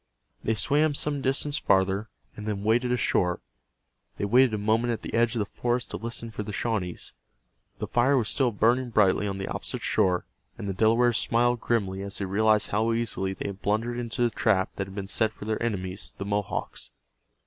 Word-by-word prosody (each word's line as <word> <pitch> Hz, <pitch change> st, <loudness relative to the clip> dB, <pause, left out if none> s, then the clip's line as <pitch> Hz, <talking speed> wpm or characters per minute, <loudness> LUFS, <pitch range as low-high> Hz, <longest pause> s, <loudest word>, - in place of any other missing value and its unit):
They 110 Hz, -, +1 dB
swam 145 Hz, +8 st, +2 dB
some 145 Hz, -1 st, -1 dB
distance 140 Hz, +2 st, 0 dB
farther, 95 Hz, +3 st, +2 dB, 0.3 s
and 105 Hz, 0 st, -7 dB
then 100 Hz, -2 st, -2 dB
waded 120 Hz, +3 st, +2 dB
ashore. 90 Hz, -7 st, +1 dB, 0.8 s
They -, -, -1 dB
waited 125 Hz, +4 st, +5 dB
a 105 Hz, -, -1 dB
moment 110 Hz, +3 st, +1 dB
at 115 Hz, -, -6 dB
the -, -, -6 dB
edge 115 Hz, 0 st, +2 dB
of -, -, -1 dB
the 105 Hz, -, 0 dB
forest 120 Hz, +4 st, -2 dB
to -, -, -3 dB
listen 115 Hz, +2 st, -6 dB
for 110 Hz, -, -5 dB
the 105 Hz, -, -5 dB
Shawnees. 100 Hz, -5 st, -3 dB, 0.6 s
The -, -, -3 dB
fire 130 Hz, +3 st, +3 dB
was 115 Hz, -4 st, +1 dB
still 130 Hz, +1 st, +2 dB
burning 120 Hz, +4 st, +2 dB
brightly 105 Hz, -2 st, +3 dB
on 95 Hz, -1 st, -3 dB
the 95 Hz, -, -4 dB
opposite -, -, -4 dB
shore, 90 Hz, -1 st, +2 dB, 0.3 s
and 100 Hz, -, -5 dB
the 100 Hz, -, -1 dB
Delawares 115 Hz, +4 st, +3 dB
smiled 120 Hz, +1 st, +2 dB
grimly 95 Hz, -5 st, 0 dB
as 100 Hz, 0 st, -4 dB
they 100 Hz, -, -2 dB
realized 105 Hz, +2 st, +2 dB
how 110 Hz, +3 st, +1 dB
easily 110 Hz, -5 st, -1 dB
they -, -, -5 dB
had 100 Hz, 0 st, -9 dB
blundered 115 Hz, +4 st, 0 dB
into 120 Hz, +1 st, -2 dB
the 120 Hz, -, +2 dB
trap 95 Hz, -3 st, +1 dB
that 95 Hz, -, -2 dB
had 95 Hz, -, -11 dB
been 100 Hz, -2 st, -4 dB
set 110 Hz, +2 st, +1 dB
for 105 Hz, -, -9 dB
their 110 Hz, 0 st, -2 dB
enemies, 95 Hz, -4 st, -3 dB
the 100 Hz, -, -5 dB
Mohawks. 100 Hz, 0 st, -3 dB
110 Hz, 205 wpm, -27 LUFS, 100-120 Hz, 0.8 s, waited